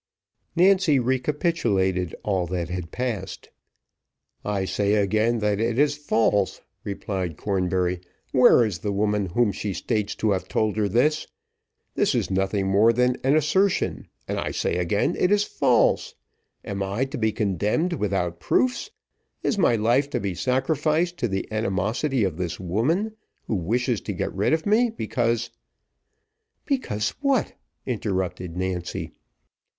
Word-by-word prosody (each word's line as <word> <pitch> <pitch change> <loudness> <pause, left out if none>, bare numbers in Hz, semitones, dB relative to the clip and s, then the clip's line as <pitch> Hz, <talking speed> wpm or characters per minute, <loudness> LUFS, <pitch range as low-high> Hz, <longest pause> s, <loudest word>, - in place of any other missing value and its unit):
Nancy 185 -4 +4
recapitulated 125 - 0
all 95 -4 0
that 85 -1 -3
had 90 -2 -4
passed. 115 -7 -4 0.9
"I 100 -2 -1
say 100 +2 +1
again, 110 +3 +2
that 105 -1 +1
it 115 +1 0
is 145 +1 +3
false," 110 -8 +1 0.2
replied 95 -5 -4
Cornbury. 90 -2 0 0.3
"Where 125 -2 +6
is 100 -6 -3
the 105 - -2
woman 105 0 0
whom 110 +4 +2
she 100 0 -4
states 105 +3 -2
to 110 - 0
have 95 -2 -1
told 110 -2 0
her 105 -2 +1
this? 150 +9 +2 0.7
This - - +1
is - - -1
nothing 95 +1 0
more 100 +4 +4
than 125 +2 +2
assertion, 155 +8 +2 0.2
and - - -2
I - - -2
say - - -1
again, 100 - +1
it 180 - +2
is 205 0 +4
false. - - +2 0.5
Am 100 -1 -4
I 100 +7 -1
to 135 +2 -6
be 110 -1 +2
condemned 105 - 0
without 95 - -1
proofs? 255 - +1 0.5
Is 210 - 0
my 120 -10 +4
life 120 +6 +2
to - - -1
be 100 -2 -2
sacrificed 155 - 0
to 120 - 0
the 95 -2 -3
animosity 110 +5 0
of 90 -5 -1
this 90 -2 -3
woman, 145 - 0 0.3
who - - -3
wishes 115 +5 0
to 105 - -4
get - - -3
rid 100 +2 +1
of 160 0 +1
me, 230 +4 +3
because 120 - -1 0.5
" 440 0 -52
"Because 110 - -1
what?" 275 -4 +1 0.3
interrupted 95 -6 -3
Nancy. 90 -2 -3
110 Hz, 145 wpm, -24 LUFS, 95-140 Hz, 0.9 s, Where